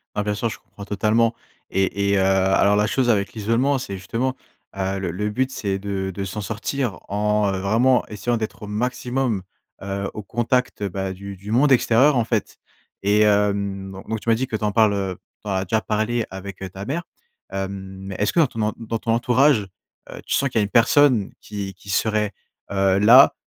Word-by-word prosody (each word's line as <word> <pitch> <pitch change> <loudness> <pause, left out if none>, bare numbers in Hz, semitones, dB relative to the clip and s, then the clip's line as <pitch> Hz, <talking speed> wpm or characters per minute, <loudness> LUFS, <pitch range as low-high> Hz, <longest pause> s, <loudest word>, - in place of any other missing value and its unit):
Bah, 105 - 0
bien 105 0 -1
sûr, 110 +3 -1
je - - -8
comprends 100 - -13
totalement. 110 +3 +2 0.4
Et 100 +1 0
et 100 - +3
heu, - - +3
alors, 95 +1 +3
la 105 0 +3
chose 125 +2 +1
avec 100 -3 +2
l'isolement, 115 +6 +1
c'est 125 -6 -5
justement, 120 +7 -2 0.4
heu, 95 0 -2
le 95 -2 -2
le 105 +5 -2
but, 130 +5 0
c'est 100 -6 -2
de 95 -1 -3
de 100 +1 -4
s'en 95 +3 -5
sortir 115 +1 -3
en, 105 0 +1
heu, 95 - -2
vraiment 115 +7 +3
essayant 120 +3 -2
d'être 110 -2 -4
au - - -6
maximum, 125 +1 -1 0.4
heu, 100 0 -3
au 105 - -5
contact, 120 +2 -1
bah, 95 -1 -3
du 100 +1 -8
du 100 +3 -8
monde 135 +5 +4
extérieur, 130 +3 +4
en 115 - +2
fait. 110 -3 -2 0.5
Et 105 +2 +3
hem, 100 -2 +1 0.2
donc, 110 - -1
tu - - -17
m'as 115 - +5
dit 130 +3 -2
que 110 - -2
tu 110 - -8
en 105 - 0
parles, 110 -2 +4
heu, 95 -2 -2 0.3
tu - - -10
en - - -1
as 95 0 0
déjà 110 +5 +1
parlé 110 +2 -1
avec 95 0 -8 0.2
ta 95 - -7
mère. 155 +8 -2 0.5
Hem, 95 0 -3 0.4
mais 95 - -5
est-ce 105 - +1
que, 170 - +4
dans 115 -4 -2
en - - -6
dans 115 0 -3
ton 115 - -1
entourage, 120 0 +3 0.4
heu, - - -9
tu - - +1
sens 140 - +1
qu'il 120 - 0
y - - +3
a - - +2
une 100 - -2
personne 120 -1 +4
qui 100 -2 -6
qui 95 - -20
serait, 105 +1 +1 0.4
heu, 95 -1 +2
là, 120 +7 +8
105 Hz, 210 wpm, -22 LUFS, 100-115 Hz, 0.5 s, là